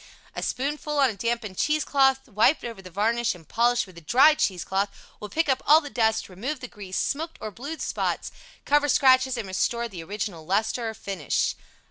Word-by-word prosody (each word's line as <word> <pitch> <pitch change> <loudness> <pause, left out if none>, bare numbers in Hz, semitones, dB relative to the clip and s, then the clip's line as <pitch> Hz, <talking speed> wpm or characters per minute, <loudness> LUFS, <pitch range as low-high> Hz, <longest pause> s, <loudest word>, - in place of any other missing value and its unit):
A - - -4
spoonful 295 +3 -2
on 270 -4 +4
a - - -9
dampened 230 -2 -3
cheese 305 0 +1
cloth 270 -1 +2
wiped 220 +9 +3
over 230 -5 -6
the 185 - -11
varnish 225 +4 0
and 165 -4 -16
polished 240 +1 +2
with 185 -3 -16
a - - -19
dry 265 - +6
cheese 185 - -1
cloth 195 +3 0 0.3
will 210 - -7
pick 325 +8 0
up 265 -1 +1
all 305 +2 +8
the 290 -3 -9
dust, 220 -2 +1
remove 245 +11 -5
the 255 - -7
grease, 195 -5 -7
smoked 320 +4 -2
or 215 - -5
blued 285 - -6
spots, - - -2 0.3
cover 290 0 +3
scratches 260 -1 +4
and 225 -4 -4
restore 235 +5 -1
the 180 -7 -8
original 195 -2 -5
lustre 220 +6 0
or 220 - -7
finish. 195 -8 -1
235 Hz, 200 wpm, -25 LUFS, 200-275 Hz, 0.3 s, all